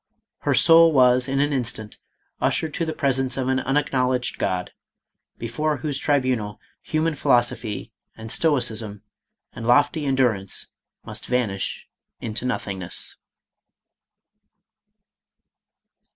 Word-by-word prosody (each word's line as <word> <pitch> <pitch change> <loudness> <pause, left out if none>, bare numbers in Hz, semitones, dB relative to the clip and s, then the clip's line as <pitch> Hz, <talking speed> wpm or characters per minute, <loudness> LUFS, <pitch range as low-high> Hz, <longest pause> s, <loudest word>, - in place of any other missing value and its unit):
Her - - +1
soul 165 0 +7
was 125 -1 +4
in 135 0 0
an 145 +1 +1
instant 115 -5 -3 0.4
ushered 160 -2 0
to 165 - -1
the 160 - -2
presence 135 -3 0
of 130 -1 -1
an 130 0 +2
unacknowledged 130 -2 0
God, 90 -1 -1 0.7
before 145 +6 -2
whose 140 +1 -3
tri 145 0 +2
bunal 120 -6 -2 0.2
human 160 +1 0
philosophy, 120 -5 0 0.3
and 110 0 -7
stoicism, 115 -9 +1 0.5
and 115 0 -6
lofty 145 +5 +3
endu 130 -2 +3
rance 95 -1 -1 0.4
must - - -7
vanish 115 -6 -2 0.3
into 115 +2 -4
nothingness. 95 -7 -2
125 Hz, 110 wpm, -23 LUFS, 115-140 Hz, 0.7 s, soul